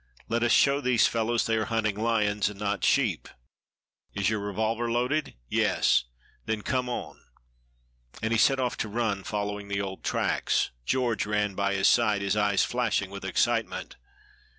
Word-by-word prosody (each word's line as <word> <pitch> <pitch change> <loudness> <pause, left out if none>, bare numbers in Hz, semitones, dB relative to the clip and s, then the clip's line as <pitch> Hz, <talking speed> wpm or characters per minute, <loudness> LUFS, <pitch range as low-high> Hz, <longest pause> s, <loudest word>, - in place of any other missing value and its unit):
Let 115 +1 -1
us 120 -1 +2
show 140 +1 +4
these 125 -4 +3
fellows 115 0 0
they 115 -1 +1
are 110 - 0
hunting 110 -3 0
lions 105 -2 +1
and 100 -1 -11
not 100 -1 -2
sheep. 115 - +1 0.9
Is 100 +1 +1
your 110 - -1
revolver 110 +4 -2
loaded?" 125 +6 -1
"Yes." - - +2 0.4
"Then 110 -1 -2
come 130 -1 -1
on!" 125 - -6 1.0
And 110 - -2
he 115 - +2
set 135 +2 +4
off 125 -2 -1
to 110 - -3
run, 105 -3 -1
following 105 -1 -3
the 100 0 -2
old 95 -1 -6
tracks. - - 0 0.2
George 120 -5 0
ran 105 -1 0
by 100 +1 0
his 95 - +3
side, 105 -4 +3
his 100 +1 0
eyes 105 -2 +2
flashing 115 -6 -1
with 100 0 -8
excitement. - - -1
110 Hz, 165 wpm, -27 LUFS, 100-120 Hz, 1.0 s, show